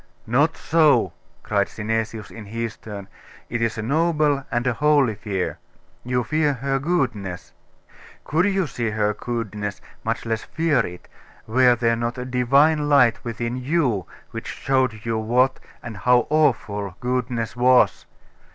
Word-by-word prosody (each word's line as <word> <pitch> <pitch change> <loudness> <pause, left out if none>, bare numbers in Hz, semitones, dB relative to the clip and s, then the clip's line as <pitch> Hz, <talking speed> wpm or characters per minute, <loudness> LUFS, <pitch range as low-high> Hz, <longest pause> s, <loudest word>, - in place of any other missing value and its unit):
'Not 140 +8 +2
so,' 145 - +3 0.3
cried 100 -1 +1
Synesius, 110 0 -3
in 110 -2 -9
his 115 +1 -4
turn; 100 -3 -9 0.4
'it 120 0 -1
is 115 -1 0
a 110 - -3
noble 150 +1 +1
and 120 +1 -1
a 125 - +2
holy 145 -2 +3
fear. 100 -3 -3 0.4
You 125 0 0
fear 155 +3 +1
her 135 +1 -1
goodness. 125 - -2 0.7
Could 160 +5 +1
you 195 -2 +1
see 120 -5 -3
her 105 -1 0
goodness, 105 -3 -4 0.2
much 115 +1 -2
less 115 -1 -1
fear 160 -4 +1
it, 90 0 -11 0.4
were 125 +2 +4
there 115 0 +1
not 120 +1 -3
a 125 - -4
Divine 140 +5 +3
Light 125 -5 +4
within 120 +1 -3
you 125 - 0 0.2
which - - -6
showed 130 -5 -1
you 115 -1 0
what, 125 +4 +2 0.2
and 115 -4 -7
how 125 +3 +3
awful, 105 - +1
goodness 125 -2 -2
was? 125 +1 +3
120 Hz, 145 wpm, -23 LUFS, 110-140 Hz, 0.7 s, were